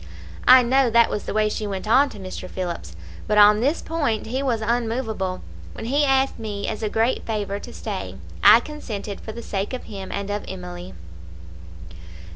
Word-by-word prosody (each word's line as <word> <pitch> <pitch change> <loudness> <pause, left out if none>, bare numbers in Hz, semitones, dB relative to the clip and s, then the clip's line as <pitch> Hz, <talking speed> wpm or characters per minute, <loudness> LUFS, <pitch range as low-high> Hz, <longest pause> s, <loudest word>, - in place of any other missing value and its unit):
I 255 0 +9
know 260 +1 +3
that 235 0 +4
was 210 - -3
the - - -3
way 215 0 +3
she 210 0 -3
went 195 +1 -5
on 270 +6 +5
to - - -11
Mr. 185 -1 -7
Phillips, 170 - -5 0.3
but 210 - +1
on 210 0 +7
this 280 +8 0
point 285 -10 -1
he 255 +4 -2
was 250 -5 0
unmovable. 225 -4 -2 0.3
When - - -7
he 285 +5 +2
asked 270 -1 +2
me 205 -2 -4
as 220 - -4
a 215 - -1
great 225 +4 +1
favour 205 -2 -2
to - - -10
stay, - - -5 0.3
I - - +9
consented 220 -9 -6
for 220 - -7
the 235 +2 -8
sake 195 +4 -3
of 255 - -4
him 195 -3 -8
and 200 0 -3
of 205 0 -3
Emily. 180 - -8
220 Hz, 190 wpm, -23 LUFS, 200-250 Hz, 0.3 s, I